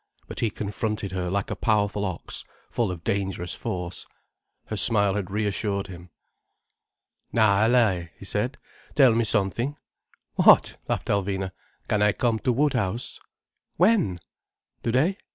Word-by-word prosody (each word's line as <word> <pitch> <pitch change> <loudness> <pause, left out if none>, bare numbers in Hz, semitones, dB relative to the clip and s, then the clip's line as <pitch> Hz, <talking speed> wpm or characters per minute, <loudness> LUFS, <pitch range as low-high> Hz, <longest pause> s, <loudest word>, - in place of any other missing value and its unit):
But - - -4
he 115 - +2
confronted 105 -1 -3
her 90 -1 -2
like 100 +2 -1
a - - -1
powerful 105 -2 +1
ox, 95 -4 -4 0.3
full 115 -4 0
of 90 -3 -6
dangerous 95 -2 -1
force. 90 -5 -5 0.6
Her 110 - -4
smile 100 -2 +3
had 100 -3 -3
reassured 100 -1 -1
him. 90 -1 -11 1.2
"Na, 110 -2 +4
Allaye," 105 -9 +3
he - - -11
said, 115 +7 -1 0.4
"tell 135 -5 +6
me 115 +1 +2
something." 110 +6 0 0.6
"What?" - - +6
laughed - - -2
Alvina. 95 -1 0 0.4
"Can 105 - +1
I 105 0 +4
come 120 -4 0
to 125 - +1
Woodhouse?" 125 -5 0 0.6
"When?" 180 - +3 0.6
"Today. 145 - +1
105 Hz, 135 wpm, -25 LUFS, 95-115 Hz, 1.2 s, tell